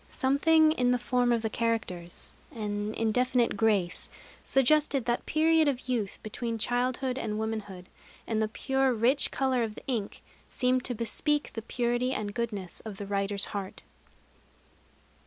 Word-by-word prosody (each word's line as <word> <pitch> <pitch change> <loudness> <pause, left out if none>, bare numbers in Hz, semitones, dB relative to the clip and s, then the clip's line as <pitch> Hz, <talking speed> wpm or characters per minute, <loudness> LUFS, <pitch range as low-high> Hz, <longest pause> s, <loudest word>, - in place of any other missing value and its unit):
Something 310 +4 +4
in 250 -5 +1
the 250 - +3
form 245 0 +1
of 230 -1 +1
the 220 - 0
characters, 220 -8 -3 0.2
an 210 -5 -3
indefinite 245 +2 +1
grace, 205 -6 +1 0.3
suggested 275 -1 +3
that 240 0 -1
period 320 0 +3
of 265 -2 -1
youth 230 -6 -1
between 230 +1 -4
childhood 250 +3 0
and 215 -3 -3
womanhood; 210 -4 -4 0.4
and 220 -1 -1
the 220 - +1
pure 265 +3 0
rich 245 +6 +2
color 260 -2 0
of 220 -2 -2
the - - -11
ink 230 -6 -3 0.3
seemed 255 0 +1
to 245 - -1
bespeak 295 +7 0
the 225 - -4
purity 240 +2 -1
and 205 -4 -3
goodness 205 -6 -4
of 215 -3 -8
the 205 - -5
writer's 200 0 0
heart. 200 -2 -5
235 Hz, 150 wpm, -29 LUFS, 215-255 Hz, 0.4 s, Something